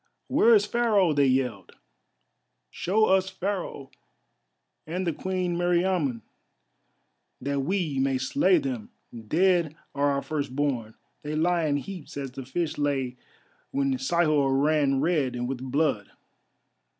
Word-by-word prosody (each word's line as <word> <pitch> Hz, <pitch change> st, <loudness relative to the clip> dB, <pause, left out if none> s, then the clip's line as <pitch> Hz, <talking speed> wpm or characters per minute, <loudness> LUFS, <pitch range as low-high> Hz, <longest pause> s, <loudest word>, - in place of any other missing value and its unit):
"Where 230 Hz, 0 st, +5 dB
is 205 Hz, -1 st, +4 dB
Pharaoh?" 210 Hz, -7 st, +2 dB
they 140 Hz, -1 st, +3 dB
yelled, 125 Hz, -8 st, -1 dB, 1.0 s
"show 215 Hz, +5 st, +1 dB
us 190 Hz, -1 st, +2 dB
Pharaoh 185 Hz, -7 st, -4 dB, 1.0 s
and 180 Hz, +4 st, -3 dB
the 170 Hz, -, 0 dB
Queen 185 Hz, +1 st, -2 dB
Meriamun, 175 Hz, -7 st, +1 dB, 1.2 s
that 140 Hz, +2 st, -2 dB
we 155 Hz, -2 st, -1 dB
may 135 Hz, 0 st, +1 dB
slay 280 Hz, -, +3 dB
them. 255 Hz, -7 st, -3 dB, 0.4 s
Dead 170 Hz, -, +2 dB, 0.2 s
are 145 Hz, 0 st, +1 dB
our 140 Hz, 0 st, -1 dB
first 145 Hz, -4 st, -3 dB
born, 125 Hz, -7 st, -1 dB, 0.3 s
they 150 Hz, +1 st, -4 dB
lie 170 Hz, +1 st, +2 dB
in 145 Hz, -1 st, +1 dB
heaps 175 Hz, 0 st, -8 dB
as 135 Hz, -2 st, -4 dB
the 130 Hz, 0 st, -8 dB
fish 155 Hz, +3 st, -2 dB
lay 135 Hz, -4 st, -1 dB, 0.5 s
when 135 Hz, -2 st, 0 dB
Sihor 145 Hz, -2 st, +2 dB
ran 145 Hz, -2 st, +2 dB
red 145 Hz, -6 st, +1 dB
with 130 Hz, -1 st, -3 dB
blood. 130 Hz, -5 st, 0 dB
150 Hz, 125 wpm, -26 LUFS, 135-180 Hz, 1.2 s, Where